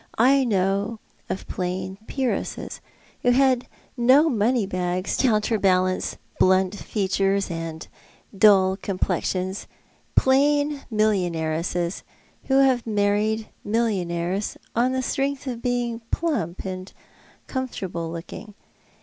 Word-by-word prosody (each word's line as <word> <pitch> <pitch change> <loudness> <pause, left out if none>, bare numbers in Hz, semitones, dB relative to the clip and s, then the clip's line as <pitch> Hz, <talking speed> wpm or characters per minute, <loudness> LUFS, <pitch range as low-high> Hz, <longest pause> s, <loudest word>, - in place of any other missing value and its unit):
I 265 +3 +5
know 200 +1 0 0.3
of 190 - -4
plain 185 +1 -4
Peeresses 265 -3 -3 0.2
— - - -31
who 245 - +2
had 255 0 +3 0.3
no 265 +6 +5
money 235 -1 +2
bags 185 0 -2
to 265 - +3
counterbalance 195 -5 +1 0.2
blunt 185 0 +4
features 195 -1 0
and 165 -1 -5 0.5
dull 190 -2 +5
comi^lexions 185 0 -2 0.2
— - - -37
plain 290 +2 +3
millionairesses, 175 -4 0 0.4
who 265 - +1
have 255 -3 +2
married 210 +1 +1
millionaire? 195 -5 0 0.3
on 245 +3 +2
the 260 - 0
strengtli 275 +2 -1
of 235 - -10
being 240 -2 -1
plump 225 - -2
and 185 0 -6 0.5
comfortable 190 -10 -4
looking. 185 +5 -8
205 Hz, 105 wpm, -24 LUFS, 185-245 Hz, 0.5 s, I